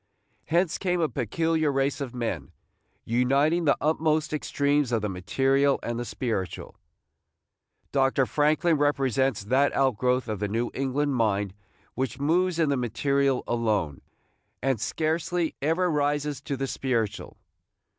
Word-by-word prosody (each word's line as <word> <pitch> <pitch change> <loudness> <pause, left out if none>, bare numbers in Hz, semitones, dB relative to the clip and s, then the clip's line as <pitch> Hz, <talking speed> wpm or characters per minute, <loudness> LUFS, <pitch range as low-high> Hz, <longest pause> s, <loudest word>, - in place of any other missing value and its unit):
Hence 170 0 +1
came 180 -2 0
a 160 - +2
peculiar 155 +4 0
race 135 +1 0
of 130 -3 -5
men, 95 - -3 0.5
uniting 140 +8 +2
the 145 - +3
utmost 155 0 +1
extremes 145 -2 0
of 115 -3 0
the 105 - -1
material 135 +9 +1
and 120 0 -3
the 120 - -3
spiritual. 110 -9 -4 1.2
Dr. 135 -1 +2
Franklin 155 +4 +2
represents 135 -5 +1
that 130 +7 +2
outgrowth 125 -1 +1
of 105 -3 -3
the 105 - -1
New 115 +4 -2
England 135 +2 -1
mind 105 -5 0 0.4
which 130 0 -3
moves 170 +4 +1
in 160 -3 +2
the 140 - +1
material 135 +3 +1
alone, 105 - -1 0.6
and 135 -4 0
scarcely 165 +1 -1
ever 165 +5 +1
rises 145 -1 0
to 140 - -4
the 135 - -1
spiritual. 115 -6 -2
135 Hz, 135 wpm, -26 LUFS, 120-150 Hz, 1.2 s, the